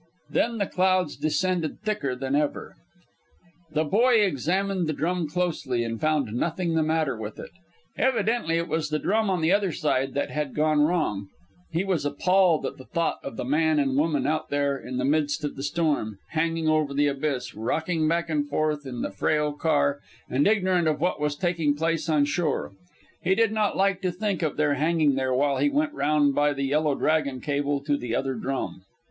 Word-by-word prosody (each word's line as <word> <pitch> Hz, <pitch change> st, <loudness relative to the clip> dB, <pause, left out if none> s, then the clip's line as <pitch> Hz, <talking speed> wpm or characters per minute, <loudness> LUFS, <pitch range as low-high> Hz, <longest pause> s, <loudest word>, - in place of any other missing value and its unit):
Then 230 Hz, 0 st, +1 dB
the 200 Hz, -, 0 dB
clouds 185 Hz, -4 st, +1 dB
descended 170 Hz, 0 st, -1 dB
thicker 210 Hz, -12 st, -2 dB
than 135 Hz, +2 st, -2 dB
ever. 150 Hz, 0 st, -1 dB, 1.0 s
The 155 Hz, +1 st, +2 dB
boy 230 Hz, -, +3 dB
examined 185 Hz, +2 st, 0 dB
the 155 Hz, -, 0 dB
drum 170 Hz, +1 st, -1 dB
closely, 155 Hz, -8 st, -1 dB
and 115 Hz, -1 st, -4 dB
found 150 Hz, -8 st, +1 dB
nothing 170 Hz, +6 st, -1 dB
the 160 Hz, -, +2 dB
matter 155 Hz, -4 st, 0 dB
with 110 Hz, -1 st, -7 dB
it. -, -, -8 dB, 0.5 s
Evidently 225 Hz, -8 st, +1 dB
it 170 Hz, +1 st, -1 dB
was 155 Hz, -1 st, -1 dB
the 155 Hz, -, 0 dB
drum 215 Hz, +6 st, +1 dB
on 185 Hz, -3 st, 0 dB
the 160 Hz, +2 st, +2 dB
other 200 Hz, -2 st, +2 dB
side 135 Hz, -4 st, -1 dB
that 140 Hz, -, -1 dB
had 150 Hz, -2 st, -3 dB
gone 155 Hz, 0 st, +2 dB
wrong. 150 Hz, -, 0 dB, 0.4 s
He 170 Hz, +3 st, -1 dB
was 185 Hz, -6 st, 0 dB
appalled 175 Hz, +3 st, +2 dB
at -, -, -4 dB
thought 170 Hz, 0 st, -1 dB
of -, -, -7 dB
the -, -, -3 dB
man 155 Hz, +3 st, +2 dB
and 135 Hz, -2 st, +1 dB
woman 150 Hz, 0 st, +1 dB
out 155 Hz, +2 st, -1 dB
there 140 Hz, -1 st, +1 dB
in 130 Hz, -1 st, -6 dB
the 130 Hz, -, 0 dB
midst 150 Hz, +1 st, +1 dB
of 145 Hz, -, -3 dB
the -, -, -7 dB
storm, 145 Hz, -, -1 dB
hanging 165 Hz, 0 st, -1 dB
over 155 Hz, -3 st, +1 dB
the 145 Hz, +1 st, +3 dB
abyss, 140 Hz, -3 st, -2 dB
rocking 155 Hz, +8 st, -1 dB
back 170 Hz, +1 st, +1 dB
and 150 Hz, -3 st, -1 dB
forth 150 Hz, -1 st, -1 dB
in 125 Hz, -2 st, -4 dB
the -, -, -3 dB
frail 150 Hz, +9 st, 0 dB
car 145 Hz, -2 st, +1 dB, 0.3 s
and 135 Hz, +3 st, +2 dB
ignorant 185 Hz, -5 st, +2 dB
of 150 Hz, -1 st, +1 dB
what 165 Hz, -2 st, 0 dB
was 150 Hz, -1 st, 0 dB
taking 165 Hz, -3 st, 0 dB
place 165 Hz, +1 st, -1 dB
on 150 Hz, -2 st, +3 dB
shore. 150 Hz, 0 st, -1 dB
And -, -, -23 dB, 0.5 s
he 185 Hz, +2 st, +2 dB
did 225 Hz, 0 st, +3 dB
not 215 Hz, -2 st, 0 dB
like 195 Hz, -1 st, +2 dB
to 185 Hz, -1 st, 0 dB
think 195 Hz, 0 st, -2 dB
of 155 Hz, -3 st, -1 dB
their 145 Hz, -1 st, +2 dB
hanging 155 Hz, 0 st, +2 dB
there 130 Hz, -1 st, -1 dB
while 140 Hz, +1 st, +2 dB
he 290 Hz, -, +2 dB
went 295 Hz, +1 st, 0 dB
round 145 Hz, -, +2 dB
by 145 Hz, +1 st, +2 dB
the 140 Hz, 0 st, -3 dB
Yellow 145 Hz, +1 st, +1 dB
Dragon 145 Hz, -4 st, 0 dB
cable 145 Hz, 0 st, -1 dB
to 145 Hz, 0 st, +1 dB
the 120 Hz, -3 st, -3 dB
other 135 Hz, +1 st, -1 dB
drum. 130 Hz, -4 st, -4 dB
155 Hz, 200 wpm, -26 LUFS, 140-175 Hz, 1.0 s, boy